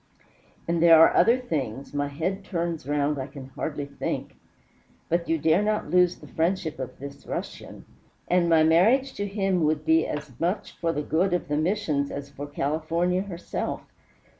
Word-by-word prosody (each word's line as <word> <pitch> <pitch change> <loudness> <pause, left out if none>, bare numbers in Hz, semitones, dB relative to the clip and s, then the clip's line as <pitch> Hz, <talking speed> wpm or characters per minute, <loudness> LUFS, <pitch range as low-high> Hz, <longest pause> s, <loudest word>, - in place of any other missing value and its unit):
And 170 0 0
there 165 -1 +8
are 165 - +7
other 235 +2 +5
things 140 - -4
my 145 0 -1
head 170 +8 -3
turns 170 -6 -3
round 145 0 0
I 130 - -4
can 135 -1 -10
hardly 145 +2 -4
think 140 0 -5 0.7
but 170 0 0
you 165 - +2
dare 160 +4 +3
not 210 -7 -1
lose 180 0 +4
the - - -13
friendship 165 -2 -1
of 130 - -6
this 140 +1 -10
Russian. - - -6 0.4
And 175 -1 +2
my 160 -1 +5
marriage 225 +12 +4
to 205 - -3
him 195 -3 0
would 155 0 0
be 160 0 +3
as 150 -2 -5
much 175 +5 -1
for 165 -1 -2
the 150 -2 -3
good 175 +6 +1
of 175 - -4
the 145 - 0
Missions 155 -4 0
as 140 0 -7
for 145 +1 -7
California 160 +5 -1
herself. 180 -3 -4
160 Hz, 175 wpm, -26 LUFS, 145-180 Hz, 0.7 s, there